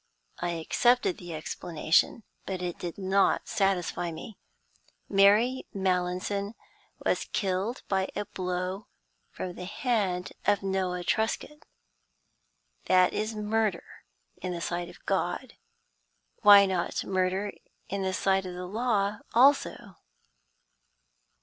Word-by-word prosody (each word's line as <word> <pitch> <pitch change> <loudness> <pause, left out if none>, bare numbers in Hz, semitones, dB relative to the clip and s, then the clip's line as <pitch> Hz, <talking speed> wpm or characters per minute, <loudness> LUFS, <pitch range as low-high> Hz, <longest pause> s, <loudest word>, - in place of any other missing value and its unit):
I 175 0 -1
accepted 240 +6 +2
the 175 -2 -7
explanation, 165 +5 0 0.2
but 190 -1 -3
it 180 -1 -4
did 175 -2 -5
not 195 0 +2
satisfy 190 -3 0
me. 195 +6 -9 0.7
Mary 210 +6 +4
Mallinson 190 +2 -1 0.5
was - - +1
killed 195 +4 -1
by 190 -1 0
a 205 - -2
blow 180 +2 -3 0.4
from 180 - -6
the 180 - -7
hand 200 -4 -1
of 205 -1 +3
Noah 185 -2 -1
Truscott. 225 +9 -2 1.2
That 185 -1 +4
is 215 +1 -2
murder 215 0 0 0.5
in 185 -1 -4
the 170 - -4
sight 175 0 -3
of - - -16
God. - - -1 0.9
Why 205 -2 +9
not 185 -3 -1
murder 190 +2 0 0.4
in 200 +1 -3
the 190 0 0
sight 190 0 +1
of 180 - -6
the 180 0 -5
law 205 0 0 0.2
also? 275 +4 +3
190 Hz, 115 wpm, -28 LUFS, 180-210 Hz, 1.2 s, Why